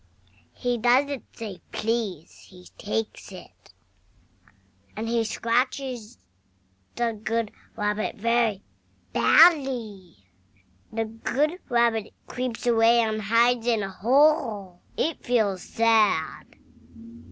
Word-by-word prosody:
HE 245 Hz, -1 st, -2 dB
doesn't 260 Hz, +4 st, +2 dB
say 210 Hz, -5 st, -7 dB
"Please." 215 Hz, -8 st, -3 dB
He 180 Hz, -1 st, -15 dB
takes 210 Hz, 0 st, -4 dB
it! 185 Hz, -2 st, -14 dB, 1.3 s
AND 220 Hz, +1 st, -3 dB
he 230 Hz, 0 st, +1 dB
scratches 245 Hz, +1 st, -2 dB, 0.8 s
the 235 Hz, -1 st, 0 dB
good 220 Hz, 0 st, -3 dB, 0.3 s
Rabbit 210 Hz, 0 st, -2 dB
very 230 Hz, -2 st, 0 dB, 0.5 s
badly. 235 Hz, -, +3 dB, 0.7 s
THE 225 Hz, 0 st, -2 dB
good 275 Hz, +9 st, -2 dB
Rabbit 235 Hz, -3 st, +1 dB
creeps 250 Hz, -2 st, -5 dB
away, 230 Hz, 0 st, +4 dB
and 215 Hz, -1 st, -1 dB
hides 230 Hz, +3 st, +2 dB
in 225 Hz, -4 st, +2 dB
a 195 Hz, -, -5 dB
hole. 230 Hz, -, +1 dB, 0.2 s
It 320 Hz, -1 st, -2 dB
feels 215 Hz, -7 st, +1 dB
sad. 220 Hz, -8 st, +1 dB
230 Hz, 95 wpm, -25 LUFS, 210-245 Hz, 1.3 s, away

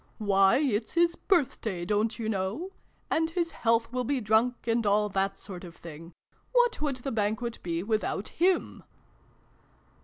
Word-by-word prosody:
" -, -, -35 dB
Why, 195 Hz, +1 st, +4 dB
it's 240 Hz, -7 st, 0 dB
his 340 Hz, 0 st, +3 dB
birthday, 235 Hz, -, 0 dB
don't 210 Hz, +3 st, 0 dB
you 225 Hz, -, -3 dB
know? 215 Hz, -, -2 dB, 0.4 s
And 320 Hz, 0 st, +2 dB
his 335 Hz, 0 st, -1 dB
health 230 Hz, 0 st, +1 dB
will 250 Hz, 0 st, 0 dB
be 275 Hz, +2 st, 0 dB
drunk, 225 Hz, +3 st, +1 dB
and 230 Hz, 0 st, +1 dB
all 210 Hz, 0 st, +2 dB
that 195 Hz, 0 st, -1 dB
sort 185 Hz, -3 st, -8 dB
of 170 Hz, -2 st, -10 dB
thing. 165 Hz, +1 st, -11 dB, 0.4 s
What 485 Hz, -5 st, +3 dB
would 290 Hz, -3 st, 0 dB
the 260 Hz, +2 st, -5 dB
Banquet 220 Hz, +2 st, -1 dB
be 170 Hz, 0 st, -2 dB
without 215 Hz, -1 st, -1 dB
him 365 Hz, +2 st, +1 dB
225 Hz, 160 wpm, -28 LUFS, 200-270 Hz, 0.4 s, Why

